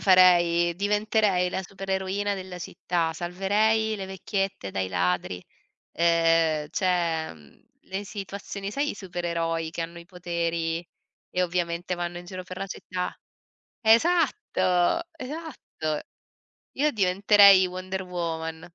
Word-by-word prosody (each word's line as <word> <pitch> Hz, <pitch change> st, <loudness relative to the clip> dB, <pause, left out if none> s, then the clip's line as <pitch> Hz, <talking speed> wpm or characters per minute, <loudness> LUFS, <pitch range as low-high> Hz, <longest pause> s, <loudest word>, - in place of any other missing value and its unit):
farei? 175 Hz, -2 st, +5 dB
Diventerei 205 Hz, -1 st, +2 dB
la 190 Hz, +1 st, -3 dB
supereroina 195 Hz, +1 st, -2 dB
della 185 Hz, -1 st, -7 dB
città, 170 Hz, -1 st, -2 dB
salverei 205 Hz, +6 st, +1 dB
le 195 Hz, -2 st, -5 dB
vecchiette 190 Hz, -, -3 dB
dai 95 Hz, -1 st, -1 dB
ladri, 90 Hz, 0 st, -1 dB, 0.5 s
ehm, 165 Hz, -2 st, +3 dB
cioè 170 Hz, -4 st, 0 dB
mhmm, 75 Hz, -2 st, -20 dB, 0.2 s
le 195 Hz, +2 st, -5 dB
situazioni 200 Hz, 0 st, -6 dB
sai 285 Hz, +6 st, -1 dB
i -, -, -5 dB
supereroi 170 Hz, -4 st, -3 dB
che 170 Hz, -, -5 dB
hanno 170 Hz, +1 st, -7 dB
i 170 Hz, -, -11 dB
poteri 170 Hz, -2 st, -2 dB, 0.4 s
e 180 Hz, -, 0 dB
ovviamente 175 Hz, 0 st, -1 dB
vanno 175 Hz, 0 st, -4 dB
in 175 Hz, -, -11 dB
giro 185 Hz, 0 st, -7 dB
per 185 Hz, 0 st, -8 dB
la 195 Hz, -, -3 dB
città? 180 Hz, -1 st, -4 dB, 0.7 s
Esatto, 230 Hz, -, +3 dB
esatto. 275 Hz, -, -5 dB, 0.8 s
Io 295 Hz, +2 st, +2 dB
diventerei 200 Hz, -1 st, +6 dB
Wonder 185 Hz, +1 st, -4 dB
Woman. 165 Hz, -2 st, -4 dB
180 Hz, 120 wpm, -26 LUFS, 170-195 Hz, 0.8 s, diventerei